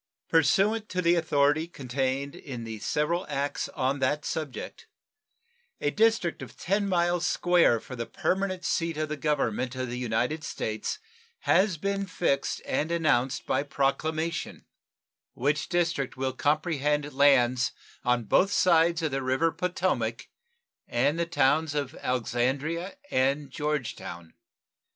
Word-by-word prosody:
Pursuant 195 +8 +3
to 180 - -2
the 170 -1 +4
authority 155 -1 +2
contained 135 -1 -2
in 125 -5 -7
the 110 -1 -6
several 165 - 0
acts 140 0 -2
on 135 +2 -1
that 145 +3 0
subject, 155 -5 -5 0.9
a 145 - 0
district 220 -4 +2
of - - -10
10 200 +2 0
miles 175 -1 +1
square 175 -9 +3
for 130 +3 -9
the 115 -1 -4
permanent 190 -1 -1
seat 165 -2 0
of 155 0 -2
the 155 - -2
Government 130 -4 -1
of 130 -1 -3
the 125 - -4
United 125 +6 -1
States 110 -5 -3 0.4
has 190 -1 +3
been 200 +3 -2
fixed 170 -6 -1
and 155 +3 -1
announced 135 -7 +1
by 130 - +1
proclamation, 155 +4 -2 0.7
which 145 +4 0
district 170 -7 0
will 130 0 -1
comprehend 150 0 0
lands 130 -3 +4 0.3
on 125 -1 +2
both 190 - +3
sides 170 -2 +3
of 155 - 0
the 135 0 -1
river 130 +6 +1
Potomac 175 -12 -1 0.6
and 140 +7 +1
the 170 - 0
towns 155 -1 +2
of 140 -3 -2
Alexandria 135 - -1 0.2
and 135 +2 +1
Georgetown. 130 - -4
150 Hz, 130 wpm, -27 LUFS, 130-170 Hz, 0.9 s, the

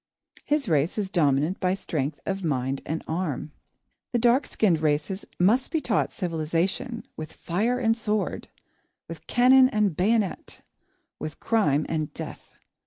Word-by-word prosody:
His 290 -3 0
race 155 +1 +1
is 200 -3 -2
dominant 150 +1 +2
by 185 0 +1
strength 150 -6 -3
of 195 0 -2
mind 135 -3 -1
and 160 +2 -3
arm. 160 -4 -3 0.6
The - - +3
dark 240 +3 +3
skinned 180 -7 +2
races 155 +5 -1
must 220 +9 +3
be 320 - 0
taught - - 0
civilisation, 180 - -2
with 155 -1 -7
fire 215 +8 -1
and 225 -3 +2
sword, 215 -2 -2 0.6
with - - -10
cannon 255 +1 +6
and 210 - +1
bayonet, 205 +2 0 0.6
with 155 - -6
crime 155 -11 +2
and 155 -2 -2
death. - - -8
185 Hz, 140 wpm, -26 LUFS, 155-225 Hz, 0.6 s, cannon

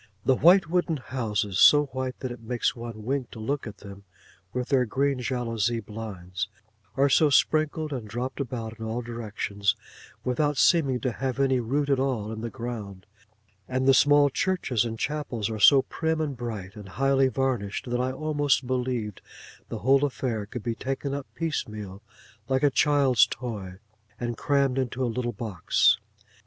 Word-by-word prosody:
The 135 - +5
white 175 +6 +6
wooden 175 -1 0
houses 110 -7 -2
(so 145 0 +7
white 130 -1 -5
that 130 - -3
it 120 - -8
makes 120 +2 -1
one 115 -2 -7
wink 130 +1 -2
to - - -10
look 130 +4 -2
at 105 -1 -9
them), 100 0 -10 0.5
with 125 0 -3
their 135 -3 +4
green 135 +3 0
jalousie 120 -2 -1
blinds, 100 -3 -6 0.5
are 140 +1 +4
so 150 +2 +4
sprinkled 155 +1 +2
and 120 -5 -5
dropped 125 +6 -4
about 115 -4 -5
in 110 - -5
all 115 +2 -3
directions, 105 -3 -2 0.5
without 145 +3 0
seeming 140 -7 +3
to 130 - 0
have 130 +2 -3
any 135 -2 +3
root 140 +5 0
at 140 -2 +2
all 125 -6 -1
in 110 0 -6
the 115 - -3
ground; 105 -6 -7 0.6
and 130 +1 -1
the 135 - +7
small 145 +1 +5
churches 130 - 0
and 115 -1 -4
chapels 125 -6 -2
are 110 - -4
so 135 +6 +7
prim, 160 0 -2
and 150 -3 -2
bright, 110 -5 -6
and 105 -2 -10
highly 135 0 +3
varnished; 130 -6 -2
that 125 0 +1
I 130 +1 0
almost 145 -1 0
believed 125 -5 -2 0.5
the - - -4
whole 135 +1 +5
affair 125 -7 -2
could 115 0 -7
be 120 - -1
taken 135 +3 -3
up 140 -1 -4
piecemeal 105 - -4 0.5
like 130 +1 +1
a 145 - +5
child's 135 -6 +4
toy, 105 -7 -6 0.4
and 120 -1 -2
crammed 140 0 +1
into 130 0 -2
a - - +2
little 120 0 -2
box. 105 -4 +2
125 Hz, 170 wpm, -26 LUFS, 110-140 Hz, 0.6 s, so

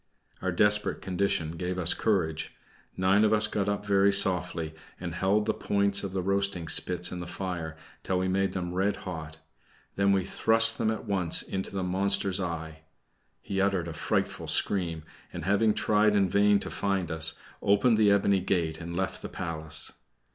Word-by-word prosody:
Our 95 - -1
desperate 105 +3 +2
condition 90 -4 -2
gave 90 +1 -3
us 90 -2 +3
courage; 80 -7 -1 0.4
nine 95 +3 +3
of 110 0 +3
us 110 0 +6
got 105 -1 -1
up 105 0 -3
very 100 0 +3
softly, 90 -4 +1 0.3
and 90 -2 -6
held 100 +4 +1
the - - 0
points 100 0 0
of 100 - -4
the 95 -1 -3
roasting 100 -3 -1
spits 90 +2 +2
in 90 - -6
the 85 - -7
fire 85 -4 -5 0.2
until 95 - -2
we 95 +1 -1
made 95 +1 0
them 90 -2 -4
red 95 +2 0
hot; 80 -3 -7 0.6
we 100 - -1
then 95 -2 +2
thrust 115 +3 +5
them 110 - +1
at 110 - -4
once 95 -5 0
into 95 0 -5
the 95 -1 -4
monster's 95 +1 +1
eye. 80 -3 -5 0.6
He 95 -1 -2
uttered 95 -3 0
a 85 - -6
frightful - - -2
scream, 85 -5 +2 0.3
and 85 -2 -7
having 105 +3 +2
tried 105 0 +2
in 100 -2 +3
vain 100 +2 +3
to - - -6
find 95 -4 -2
us, 80 0 +2 0.2
opened 105 +3 +3
the 105 -1 +4
ebony 100 -1 +3
gate 85 -4 -2
and 85 0 -7
left 95 0 -3
the - - -7
palace. 80 -2 -2
95 Hz, 180 wpm, -27 LUFS, 85-100 Hz, 0.6 s, us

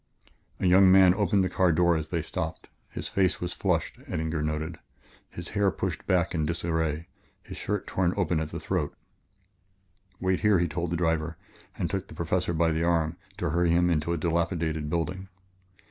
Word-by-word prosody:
A - - -1
young 95 +1 +7
man 95 -1 +7
opened 100 -1 +2
the - - +1
car 90 -1 +2
door 85 +1 +3
as 80 -1 -3
they 85 -3 -1
stopped. 80 0 -4 0.2
His - - -5
face 95 -5 +1
was - - -3
flushed, - - -1
Eddinger 80 0 -2
noted, 80 +2 -3 0.7
hair 100 -1 +2
pushed - - -4
back 90 -1 +2
in 80 -3 0
disarray, 80 -1 -1 0.4
his - - -9
shirt 105 -1 -2
torn 90 -2 +1
open 85 -4 +1
at 80 -1 -3
the - - -5
throat. - - -2 1.2
"Wait 95 0 +1
here," 105 -3 +4
he 85 0 +1
told 85 +2 -3
the 85 - -1
driver 80 -1 0 0.4
and - - -1
took - - -3
the - - -11
Professor 85 +1 0
by 80 0 +2
the 80 +1 0
arm 85 -1 +1 0.2
to 85 -3 -1
hurry 85 +1 +2
him 90 +1 +3
into 80 0 0
a 85 - 0
dilapidated 80 -2 -1
building. 90 +3 -2
85 Hz, 180 wpm, -27 LUFS, 80-90 Hz, 1.2 s, young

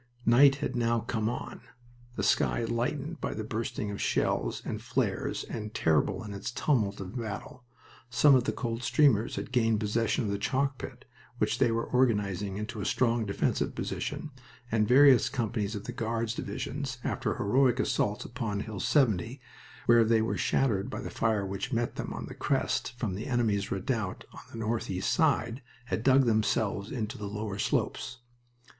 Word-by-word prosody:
Night 135 +4 +7
had 140 -3 -3
now 115 -1 +1
come 110 -1 -1
on, 120 - -6 0.5
the - - -2
sky 120 - +2
lightened 140 +7 -2
by - - -2
the 110 - -3
bursting 110 -1 -3
of 100 - -5
shells - - 0
and - - -4
flares, - - -1
and 110 -2 -6
terrible 80 +5 +2
in 105 -2 -7
its 100 - -4
tumult 115 -6 0
of 95 +3 -7
battle. 120 +3 -6 0.4
Some 140 +4 +5
of 125 -2 +4
the - - +1
Coldstreamers 125 0 +2
had - - -5
gained 115 -3 +2
possession 110 +3 0
of 100 - -1
the 100 - -2
chalk 135 +5 0
pit, 125 -2 -8 0.3
which - - 0
they 125 -3 +4
were 115 0 0
organizing 105 -6 +1
into 105 +1 -5
a - - -3
strong 115 -3 +1
defensive 100 - 0
position, 155 - -4 0.4
and 105 -1 +2
various 130 0 +6
companies 110 -4 -2
of 100 - -5
the 125 - -5
Guards 115 -1 -2
divisions, 135 +1 -4
after 125 -5 -1
heroic 125 +4 +2
assaults 105 -5 0
upon 115 -5 -3
Hill 105 -3 -6
70, 120 - +2 0.5
where 120 -1 +6
they 110 0 +3
were 115 - -1
shattered 105 -8 +1
by - - -5
the - - -6
fire 110 -3 +1
which 100 +7 -4
met 120 -1 -1
them - - -4
on - - -5
the - - -8
crest 120 - -1
from 110 -7 -2
the 100 +4 -5
enemy's 110 -6 +1
redoubt 100 0 -2
on - - -10
the - - -8
northeast 110 -4 -1
side, 135 -6 +1 0.2
had 125 - -2
dug 130 +2 +5
themselves 110 -2 +1
into 110 -4 -4
the 105 - -4
lower 105 0 -4
slopes. 125 - -1
115 Hz, 175 wpm, -29 LUFS, 105-125 Hz, 0.5 s, Night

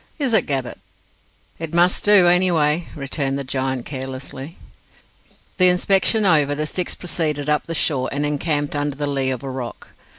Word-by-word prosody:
"Is 275 -6 -1
it, 220 - +3
Gabbett?" 135 -3 -3 0.8
"It 165 0 -5
must 175 +1 +3
do, 205 -3 +6
any 180 +1 +4
way," 155 0 +1
returned 135 -1 -2
the 140 - -4
giant 130 -1 -3
carelessly. 135 +2 -6 1.0
The 185 -2 +5
inspection 195 +4 +2
over, 150 -5 +3
the 155 +1 -2
six 180 +3 -3
proceeded 155 -5 -2
up 150 +1 0
the 165 - -3
shore, 135 -5 +1
and 145 +1 -1
encamped 145 0 -1
under 145 -1 -2
the 145 +1 -3
lee 135 -2 -1
of 130 -1 -4
a 135 - -5
rock. 125 -2 -7
150 Hz, 170 wpm, -20 LUFS, 135-175 Hz, 1.0 s, do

